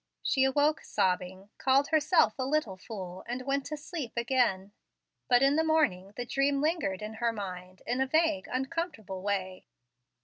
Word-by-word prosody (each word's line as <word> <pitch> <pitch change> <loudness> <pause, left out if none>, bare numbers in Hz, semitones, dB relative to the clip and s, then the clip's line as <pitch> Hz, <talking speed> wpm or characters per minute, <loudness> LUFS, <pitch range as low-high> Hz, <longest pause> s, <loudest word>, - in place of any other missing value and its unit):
She 265 -3 +3
awoke 290 +4 +2
sobbing, 185 +2 -1
called 270 +2 +3
herself 310 - +4
a - - +1
"little 265 -7 0
fool," 185 -2 -8
and 250 +2 -4
went 275 +1 -1
to 305 +1 -4
sleep 295 -4 -6
again. 235 -6 +1 0.6
But 245 +1 +5
in 275 +2 +4
the 320 - +3
morning 225 - +1
the 245 - -4
dream 275 +2 +1
lingered 290 - 0
in 215 +1 -5
her 235 -1 +2
mind 185 -3 -7
in 245 +3 0
a 265 - +2
vague, 315 0 +2
uncomfortable 260 - -3
way. 190 -2 -3
255 Hz, 165 wpm, -30 LUFS, 195-290 Hz, 0.6 s, But